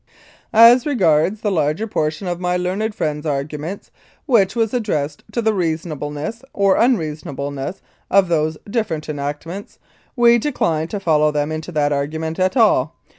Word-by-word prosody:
As 235 Hz, +4 st, +7 dB
regards 190 Hz, -, +2 dB
the 210 Hz, -, 0 dB
larger 155 Hz, +4 st, 0 dB
portion 155 Hz, -2 st, -2 dB
of 175 Hz, -1 st, -2 dB
my 180 Hz, 0 st, 0 dB
learned 195 Hz, +5 st, -2 dB
friend's 150 Hz, -2 st, -2 dB
arguments, 150 Hz, +6 st, -4 dB, 0.3 s
which 215 Hz, -6 st, +3 dB
was 225 Hz, -1 st, 0 dB
addressed 155 Hz, -, -2 dB
to 235 Hz, -, -2 dB
the 220 Hz, 0 st, +2 dB
reasonable 160 Hz, -5 st, -2 dB
ness 150 Hz, +11 st, -5 dB
or 195 Hz, -1 st, +3 dB
unreasonableness 150 Hz, -, -1 dB, 0.3 s
of 195 Hz, -1 st, +4 dB
those 155 Hz, -2 st, 0 dB
different 200 Hz, -9 st, -2 dB
enactments, 150 Hz, +6 st, -5 dB, 0.4 s
we 235 Hz, -1 st, +5 dB
decline 165 Hz, -, -1 dB
to 205 Hz, -, -4 dB
follow 155 Hz, -5 st, +3 dB
them 150 Hz, 0 st, -1 dB
into 155 Hz, +2 st, -5 dB
that 145 Hz, -1 st, +1 dB
argument 160 Hz, +4 st, -3 dB
at 185 Hz, +7 st, +1 dB
all. 180 Hz, -, +3 dB
170 Hz, 150 wpm, -19 LUFS, 150-210 Hz, 0.4 s, As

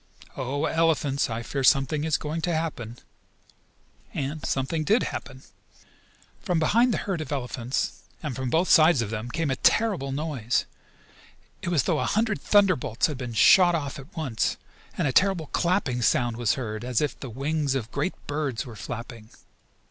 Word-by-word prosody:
Oh, 135 Hz, +3 st, -2 dB
elephants, 155 Hz, -5 st, +1 dB
I 115 Hz, +1 st, -3 dB
fear 135 Hz, +3 st, -3 dB
something 140 Hz, +3 st, +3 dB
is 160 Hz, -2 st, +2 dB
going 155 Hz, +2 st, -4 dB
to 175 Hz, -, -1 dB
happen." 125 Hz, -8 st, -4 dB, 1.2 s
And 145 Hz, +2 st, -3 dB
something 140 Hz, +4 st, -1 dB
did 215 Hz, +9 st, +3 dB
happen. 130 Hz, 0 st, -7 dB, 1.0 s
From 175 Hz, -, -1 dB
behind 230 Hz, +10 st, +3 dB
the -, -, 0 dB
herd 185 Hz, -5 st, -2 dB
of 155 Hz, -, -7 dB
elephants, 125 Hz, -2 st, -3 dB, 0.2 s
and 145 Hz, -5 st, -3 dB
from 130 Hz, -1 st, -3 dB
both 165 Hz, +7 st, +2 dB
sides 155 Hz, -6 st, +6 dB
of 105 Hz, -, -6 dB
them, 115 Hz, +2 st, -4 dB
came 160 Hz, +1 st, -1 dB
a -, -, +1 dB
terrible 195 Hz, -12 st, +2 dB
noise. 135 Hz, -5 st, -1 dB, 1.0 s
It -, -, -6 dB
was 170 Hz, -5 st, +3 dB
as -, -, -10 dB
though -, -, +1 dB
a -, -, 0 dB
hundred 220 Hz, -1 st, 0 dB
thunderbolts 185 Hz, -, +3 dB
had 150 Hz, -4 st, -2 dB
been 125 Hz, -3 st, -5 dB
shot 175 Hz, -, +6 dB
off 145 Hz, -3 st, -4 dB
at 155 Hz, +7 st, -14 dB
once, 130 Hz, -8 st, -1 dB, 0.4 s
and -, -, +1 dB
a 130 Hz, -, -1 dB
terrible 190 Hz, -2 st, +3 dB
clapping 170 Hz, -9 st, +1 dB
sound 120 Hz, 0 st, +2 dB
was 120 Hz, -2 st, +1 dB
heard, 110 Hz, -4 st, -5 dB
as 125 Hz, -2 st, 0 dB
if 150 Hz, -4 st, -2 dB
the 135 Hz, -, -7 dB
wings 140 Hz, +3 st, -1 dB
of 115 Hz, -4 st, -3 dB
great 185 Hz, -, -2 dB
birds 145 Hz, -5 st, -2 dB
were 120 Hz, -3 st, -9 dB
flapping. 115 Hz, +1 st, -8 dB
140 Hz, 175 wpm, -26 LUFS, 125-165 Hz, 1.2 s, sides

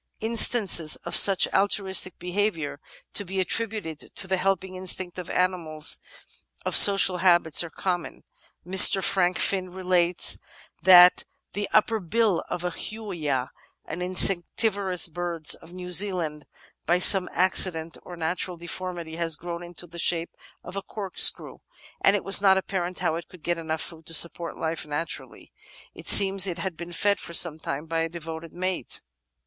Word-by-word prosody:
Instances 220 Hz, -7 st, +2 dB
of -, -, -2 dB
such 195 Hz, -2 st, +6 dB
altruistic 190 Hz, -2 st, 0 dB
behaviour, 180 Hz, -5 st, -4 dB, 0.3 s
to 205 Hz, -, 0 dB
be 190 Hz, 0 st, -6 dB
attributed 200 Hz, -5 st, -3 dB
to -, -, -1 dB
the 190 Hz, 0 st, -2 dB
helping 190 Hz, 0 st, -3 dB
instinct 185 Hz, -1 st, -1 dB
in 180 Hz, -, -9 dB
animals 170 Hz, -4 st, -1 dB, 0.7 s
of -, -, 0 dB
social 195 Hz, -2 st, +7 dB
habits, 175 Hz, -3 st, +2 dB
are 170 Hz, -, -9 dB
common. 175 Hz, +1 st, -6 dB, 0.4 s
Mr. 190 Hz, +1 st, +7 dB
Frank 180 Hz, -1 st, 0 dB
Finn 185 Hz, -2 st, -1 dB
relates 180 Hz, -1 st, +1 dB, 0.4 s
that 180 Hz, -1 st, +5 dB, 0.3 s
the 205 Hz, 0 st, -5 dB
upper 220 Hz, +1 st, +1 dB
bill 205 Hz, 0 st, -1 dB
of 175 Hz, -, -6 dB
a 180 Hz, -, -4 dB
Huia, 165 Hz, -, -5 dB, 0.3 s
an 165 Hz, +4 st, -8 dB
insectivorous 185 Hz, +1 st, +1 dB
bird 170 Hz, -1 st, -7 dB, 0.2 s
of 170 Hz, -, -15 dB
New 180 Hz, 0 st, -10 dB
Zealand, 175 Hz, -6 st, 0 dB, 0.4 s
by 175 Hz, -, +2 dB
some 185 Hz, 0 st, +5 dB
accident 175 Hz, -3 st, 0 dB
or 180 Hz, -, -12 dB
natural 175 Hz, +2 st, -4 dB
deformity 170 Hz, -1 st, -7 dB
had 165 Hz, -3 st, 0 dB
grown 170 Hz, +1 st, -8 dB
into 175 Hz, 0 st, -10 dB
the 170 Hz, 0 st, -10 dB
shape 170 Hz, 0 st, -1 dB, 0.3 s
of -, -, -11 dB
a 200 Hz, -, -5 dB
corkscrew, 195 Hz, -1 st, +1 dB, 0.4 s
and 195 Hz, -, +3 dB
it 205 Hz, -, -4 dB
was 195 Hz, +1 st, +4 dB
not 190 Hz, -1 st, +3 dB
apparent 185 Hz, -2 st, -5 dB
how 160 Hz, -, -2 dB
it 170 Hz, -, -10 dB
could 180 Hz, -4 st, -18 dB
get 175 Hz, -1 st, -3 dB
enough 160 Hz, -1 st, -5 dB
food 160 Hz, -1 st, -9 dB
to 165 Hz, -, +3 dB
support 170 Hz, +1 st, +2 dB
life 160 Hz, 0 st, -4 dB
naturally. 150 Hz, +3 st, -6 dB, 0.4 s
It -, -, -12 dB
seems 195 Hz, -1 st, +7 dB
it 180 Hz, -2 st, -6 dB
had 180 Hz, 0 st, -6 dB
been 170 Hz, +1 st, -10 dB
fed 200 Hz, +3 st, -1 dB
for 170 Hz, -, -9 dB
some 165 Hz, -2 st, +3 dB
time 145 Hz, 0 st, -7 dB
by 165 Hz, 0 st, -4 dB
a 165 Hz, -, -3 dB
devoted 165 Hz, -1 st, -10 dB
mate. 185 Hz, -6 st, -3 dB
180 Hz, 160 wpm, -23 LUFS, 165-190 Hz, 0.7 s, social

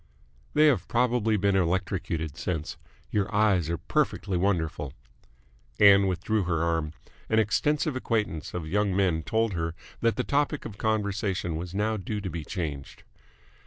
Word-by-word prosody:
"They 150 Hz, +1 st, +6 dB
have 135 Hz, -11 st, +3 dB
probably 120 Hz, -3 st, +2 dB
been 100 Hz, 0 st, +2 dB
electrocuted 90 Hz, -4 st, -1 dB
since. 80 Hz, -4 st, -3 dB, 0.4 s
Your 105 Hz, -1 st, 0 dB
eyes 100 Hz, -6 st, +2 dB
are 85 Hz, -, -1 dB
perfectly 100 Hz, +3 st, -1 dB
wonderful!" 80 Hz, -7 st, -1 dB, 0.9 s
Ann 100 Hz, -1 st, +7 dB
withdrew 95 Hz, +3 st, 0 dB
her 85 Hz, -2 st, 0 dB
arm. 80 Hz, -2 st, 0 dB, 0.4 s
An 110 Hz, -, +2 dB
extensive 140 Hz, +8 st, +1 dB
acquaintance 105 Hz, -, -2 dB
of 85 Hz, -3 st, -4 dB
young 100 Hz, +2 st, +1 dB
men 90 Hz, -5 st, +2 dB
told 110 Hz, +7 st, 0 dB
her 80 Hz, -1 st, -2 dB, 0.2 s
that 115 Hz, -1 st, +2 dB
the 125 Hz, -, -1 dB
topic 145 Hz, +1 st, 0 dB
of 100 Hz, -, -8 dB
conversation 100 Hz, -5 st, -1 dB
was 90 Hz, +3 st, -5 dB
now 110 Hz, +2 st, 0 dB
due 105 Hz, +2 st, -4 dB
to 95 Hz, -3 st, -5 dB
be 80 Hz, -1 st, -4 dB
changed. 75 Hz, -6 st, -5 dB
100 Hz, 150 wpm, -27 LUFS, 85-110 Hz, 0.9 s, Ann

